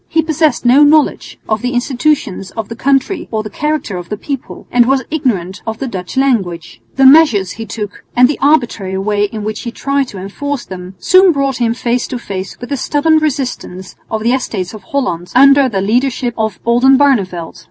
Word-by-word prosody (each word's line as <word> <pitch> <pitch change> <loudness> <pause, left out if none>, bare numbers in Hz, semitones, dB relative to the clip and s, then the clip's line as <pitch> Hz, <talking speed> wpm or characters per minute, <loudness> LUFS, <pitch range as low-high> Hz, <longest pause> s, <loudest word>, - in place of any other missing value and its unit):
He 320 0 +1
possessed 315 -3 0
no 260 +5 +6
knowledge 300 0 +2
of 215 0 -1
the 250 +1 -2
institutions 245 -6 -1
of 220 -2 -4
the 230 - -6
country 275 - 0
or 220 -1 -2
the 215 - -8
character 300 -10 -2
of 175 -1 -8
the 210 - -3
people, 275 +3 -6
and 240 -1 +4
was 265 0 +2
ignorant 205 - -2
of 220 0 -3
the 270 - -4
Dutch 190 -3 -6
language. 175 - -1
The 270 - +3
measures 265 - +5
he 225 0 -7
took 210 -2 -6
and 250 0 +6
the 290 - -3
arbitrary 235 -10 +1
way 205 +1 0
in 215 +1 -6
which 215 0 -4
he 235 - -5
tried 275 +2 -1
to 205 - -10
enforce 255 +8 -5
them, 185 0 -9
soon 370 0 +5
brought 275 -3 -1
him 230 -2 0
face 240 0 -1
to 250 - -4
face 195 -5 -6
with 245 +2 -9
the 280 - 0
stubborn 310 +4 +2
resistance 255 -11 -4
of 220 -1 -3
the 235 +2 +2
Estates 205 -8 -3
of 215 - -9
Holland 180 -11 -3
under 275 +1 +6
the 195 -4 -2
leadership 245 +4 0
of 220 -1 -2
Oldenbarneveldt. 240 -8 +2
245 Hz, 195 wpm, -14 LUFS, 205-275 Hz, -, no